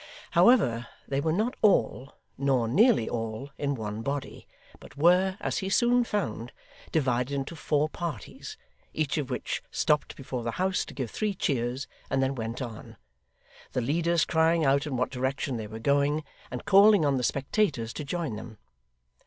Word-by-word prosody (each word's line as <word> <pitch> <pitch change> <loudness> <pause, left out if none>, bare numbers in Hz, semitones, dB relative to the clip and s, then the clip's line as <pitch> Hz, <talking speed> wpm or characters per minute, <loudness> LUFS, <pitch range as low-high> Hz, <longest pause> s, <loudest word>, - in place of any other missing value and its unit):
However, 120 - +4 0.2
they 140 0 -1
were 160 +2 0
not 215 +9 0
all, 135 - +2 0.2
nor 130 -4 +1
nearly 200 - +4
all, 115 +4 -4
in 140 -1 0
one 110 -2 -5
body, 140 +3 -4 0.3
but 130 - -15
were, 180 +5 +4
as - - -2
he 190 - -3
soon 240 +4 +3
found, 120 - -3 0.4
divided 130 -2 0
into 140 +4 -4
four 150 -1 +1
parties, 175 - -6 0.4
each 155 0 0
of 140 - -4
which - - -3
stopped 150 -1 0
before 130 -2 -5
the 115 0 -3
house 185 +1 0
to - - -11
give 130 -6 -4
three 210 -2 -1
cheers, 130 -4 -1 0.2
and 135 - +1
then 135 0 +1
went 115 +1 -4
on; 115 -3 -9 0.8
the 125 - 0
leaders 165 +6 +1
crying 160 0 +2
out 140 +2 +2
in 135 -4 -2
what 125 - 0
direction 130 0 -2
they 110 -2 -5
were 110 +1 -8
going, 140 +5 +1 0.3
and 125 - -6
calling 200 -3 +6
on 140 -2 +2
the 125 - -2
spectators 140 - 0
to 150 - -5
join 145 -6 -3
them. 110 0 -9
140 Hz, 170 wpm, -28 LUFS, 125-170 Hz, 0.8 s, calling